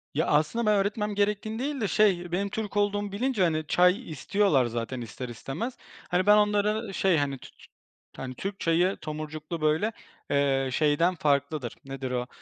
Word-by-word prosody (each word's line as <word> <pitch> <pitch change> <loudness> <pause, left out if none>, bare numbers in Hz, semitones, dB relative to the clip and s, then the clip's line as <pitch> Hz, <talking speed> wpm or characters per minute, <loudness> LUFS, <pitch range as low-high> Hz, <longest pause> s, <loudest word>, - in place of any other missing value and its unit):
Ya, 160 +4 +1
aslında 155 +11 +2
ben 210 0 +4
öğretmem 205 +1 0
gerektiğini 210 +2 0
değil 280 0 -2
de 210 - +1
şey 190 -5 +2
benim 195 +3 -1
Türk 210 0 -4
olduğumu 205 0 0
bilince, 225 0 0
hani, 155 -3 0
çay 180 - +3
istiyorlar 155 -3 +2
zaten 120 +2 -4
ister 120 +2 -7
istemez. 145 - -5 0.3
Hani, 180 +1 +1
ben 210 +1 +7
onları 210 +1 +1
şey, 190 -3 +2
hani, 140 -2 -1
tü - - -13
tü - - -19 0.5
hani, 130 -1 -6
Türk 195 +7 -5
çayı 175 +3 +2
tomurcuklu, 155 +1 -5
böyle, 155 +8 +2 0.4
eee, 135 -2 +2
şeyden 155 +6 +2
farklıdır. 140 -4 0
Nedir 135 -1 -5
o? 125 0 -2
175 Hz, 170 wpm, -27 LUFS, 145-205 Hz, 0.5 s, ben